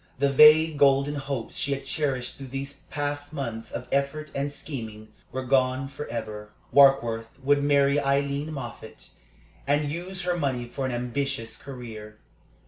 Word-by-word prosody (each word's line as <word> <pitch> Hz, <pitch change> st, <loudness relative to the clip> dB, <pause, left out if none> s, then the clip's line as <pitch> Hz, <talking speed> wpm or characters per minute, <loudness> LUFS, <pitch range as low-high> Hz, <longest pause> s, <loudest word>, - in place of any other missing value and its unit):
The 140 Hz, +1 st, +2 dB
vague, 155 Hz, +1 st, +7 dB
golden 140 Hz, +1 st, +4 dB
hopes 135 Hz, -4 st, -4 dB
she 140 Hz, -, 0 dB
had 135 Hz, 0 st, -5 dB
cherished 135 Hz, -3 st, -2 dB
through 135 Hz, -1 st, -8 dB
these 135 Hz, +2 st, -5 dB, 0.2 s
past 145 Hz, 0 st, -3 dB
months 115 Hz, -6 st, -5 dB
of 125 Hz, -, -5 dB
effort 140 Hz, +2 st, -1 dB
and 140 Hz, +1 st, -2 dB
scheming 110 Hz, -7 st, -7 dB, 0.2 s
were 130 Hz, -, -3 dB
gone 130 Hz, +1 st, +2 dB
forever. 110 Hz, -6 st, -6 dB, 0.2 s
Warkworth 120 Hz, -5 st, +5 dB, 0.2 s
would 145 Hz, +1 st, +3 dB
marry 140 Hz, 0 st, +4 dB
Aileen 140 Hz, +2 st, 0 dB
Moffatt, 120 Hz, -6 st, -8 dB, 0.6 s
and 145 Hz, +1 st, +1 dB
use 175 Hz, +3 st, -5 dB
her 180 Hz, 0 st, 0 dB
money 130 Hz, -7 st, -1 dB
for 130 Hz, +2 st, -3 dB
an -, -, -2 dB
ambitious 125 Hz, -1 st, -3 dB
career. 110 Hz, -6 st, -9 dB
140 Hz, 145 wpm, -26 LUFS, 125-145 Hz, 0.6 s, vague